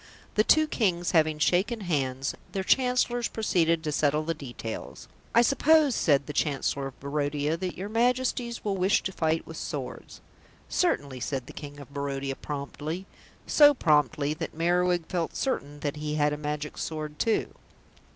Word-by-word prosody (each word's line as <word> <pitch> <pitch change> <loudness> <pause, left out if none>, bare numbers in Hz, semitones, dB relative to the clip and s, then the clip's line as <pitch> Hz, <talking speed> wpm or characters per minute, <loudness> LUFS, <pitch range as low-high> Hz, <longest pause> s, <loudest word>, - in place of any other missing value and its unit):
The 215 - +4
two 310 +7 +5
Kings 180 - 0
having 155 -2 +3
shaken 190 +9 +1
hands, 135 -7 -1 0.2
their 195 - -1
Chancellors 250 +1 +2
proceeded 170 -7 +1
to 150 - -1
settle 150 +1 +1
the 165 +1 -1
details. 115 - -7 0.3
"I 235 - +7
suppose," 295 +2 +4
said 140 -9 +2
the 150 - -6
Chancellor 140 -2 0
of 135 - -12
Barodia, 145 +2 -1
"that 180 0 -4
your 195 - -4
Majesties 240 +1 0
will 200 -2 0
wish 190 +1 +2
to 190 - -2
fight 160 -2 0
with - - -9
swords?" - - -6 0.5
"Certainly," 140 - 0
said 130 +1 -3
the - - -11
King 145 -1 -9
of 140 0 -12
Barodia 140 -1 -3
promptly; 150 +6 -5 0.4
so 290 -1 +6
promptly 150 - +2
that 155 - -6
Merriwig 175 0 +2
felt 170 -1 -2
certain 145 - -2
that 145 0 -2
he 150 0 -3
had 150 -1 +2
a - - -1
Magic 150 0 -4
Sword 155 -1 -5
too. 225 - +1
155 Hz, 160 wpm, -27 LUFS, 145-195 Hz, 0.5 s, I